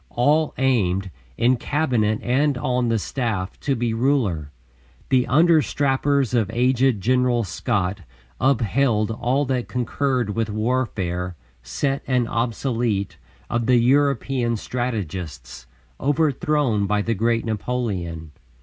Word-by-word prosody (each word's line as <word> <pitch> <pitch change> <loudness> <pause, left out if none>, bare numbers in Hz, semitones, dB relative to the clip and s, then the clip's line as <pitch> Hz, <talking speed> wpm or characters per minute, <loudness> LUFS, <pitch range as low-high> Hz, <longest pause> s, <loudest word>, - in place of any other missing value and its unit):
All 150 +5 +2
aimed, 95 -8 +1 0.3
in 125 +2 +3
Cabinet 120 -7 0
and 135 +2 +1
on 125 -1 0
the 115 - +2
staff, 110 -4 -3
to 140 - 0
be 120 -1 -1
ruler. 115 - 0 0.6
The 130 -2 +3
understrappers 140 -4 +2
of 110 -4 +1
aged 125 0 +2
General 125 +1 +2
Scott 95 0 -2 0.4
upheld 120 -3 +2
all 125 +5 0
that 130 -2 -1
concurred 125 -2 -1
with 115 +1 -1
warfare, 105 -6 -2 0.3
set 135 - -2
and 125 -3 +1
obsolete, 115 -3 -1 0.3
of 115 -1 -1
the 125 - +5
European 130 -2 +2
strategists, 90 - -5 0.3
overthrown 145 - +1
by 105 +1 +1
the 115 - 0
great 115 +2 0
Napoleon. 100 -8 -3
120 Hz, 115 wpm, -22 LUFS, 105-130 Hz, 0.6 s, the